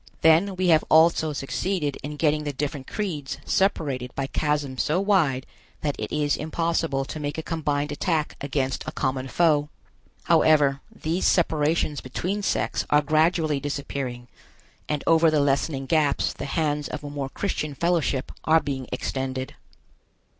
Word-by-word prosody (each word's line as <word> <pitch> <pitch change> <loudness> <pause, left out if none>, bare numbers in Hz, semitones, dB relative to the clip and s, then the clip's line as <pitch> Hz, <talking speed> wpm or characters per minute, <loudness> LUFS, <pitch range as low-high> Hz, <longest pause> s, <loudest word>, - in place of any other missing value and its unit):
Then 165 +5 +4
we 185 -1 +1
have 160 -2 +5
also 160 0 +5
succeeded 150 +2 -2
in 150 +2 -5
getting 150 0 +1
the 145 - -2
different 140 0 -4
creeds 160 -10 -3
separated 140 -10 0
by 135 - -1
chasms 145 -2 -1
so 155 +4 +1
wide 170 -10 +2 0.4
that 145 -2 -1
it - - -4
is 150 -1 +1
impossible 160 -3 -1
to 155 - -6
make 145 0 -3
a 160 - -3
combined 150 -3 -1
attack 155 +1 -1
against 135 -2 -1
a - - -2
common 130 -1 -2
foe. 150 0 +2 0.5
However, 150 -4 +4
these 165 +4 -1
separations 155 -3 +1
between 180 +10 -3
sects 195 - 0
are 150 0 +4
gradually 155 0 +2
disappearing, 135 -3 -4 0.6
and 150 -2 -1
over 165 0 +5
the 155 -1 +2
lessening 140 0 0
gaps 150 -1 +1
the - - -6
hands 150 0 -1
of 150 -1 -6
a 145 - -5
more 140 -2 -4
Christian 155 -4 -3
fellowship 165 -5 0
are 160 +1 +5
being 135 -4 -4
extended. 130 +1 -3
150 Hz, 150 wpm, -25 LUFS, 140-160 Hz, 0.6 s, have